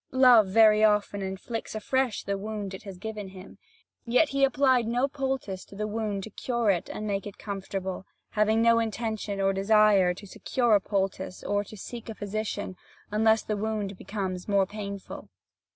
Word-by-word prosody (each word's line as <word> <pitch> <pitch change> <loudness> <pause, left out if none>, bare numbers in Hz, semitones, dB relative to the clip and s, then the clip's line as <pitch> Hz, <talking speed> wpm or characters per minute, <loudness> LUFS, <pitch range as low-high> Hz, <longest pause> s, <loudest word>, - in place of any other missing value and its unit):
Love 250 -5 +7
very 215 +1 +5
often 210 -1 +2
inflicts 195 +5 -5
afresh 250 +2 0
the 200 - -1
wound 205 -1 -5
it 190 - -7
has 195 -3 -9
given 210 0 -6
him. 190 0 -12 0.4
Yet, 250 +6 +3
he 275 0 0
applied 260 -3 +3
no 245 +4 +1
poultice 265 -9 -3
to - - -14
the 210 +1 -2
wound 210 -2 -2
to 220 - -8
cure 235 -1 0
it 175 -3 -2
and 215 - -5
make 200 0 -2
it 205 - -9
comfortable, 195 -2 -5 0.2
having 220 +1 +2
no 230 0 +5
intention 220 -2 -3
or 195 0 +2
desire 195 -2 +4
to 205 - -11
secure 240 +4 0
a 205 - +5
poultice 190 -2 -2
or 205 0 0
to 215 - -11
seek 235 +4 -8
a 225 - -5
physician, 205 -2 -4 0.3
unless 220 +1 +3
the 215 - -2
wound 210 -1 -2
becomes 185 -2 -4
more 200 -2 +3
painful. 200 -1 -7
210 Hz, 175 wpm, -27 LUFS, 195-225 Hz, 0.4 s, Love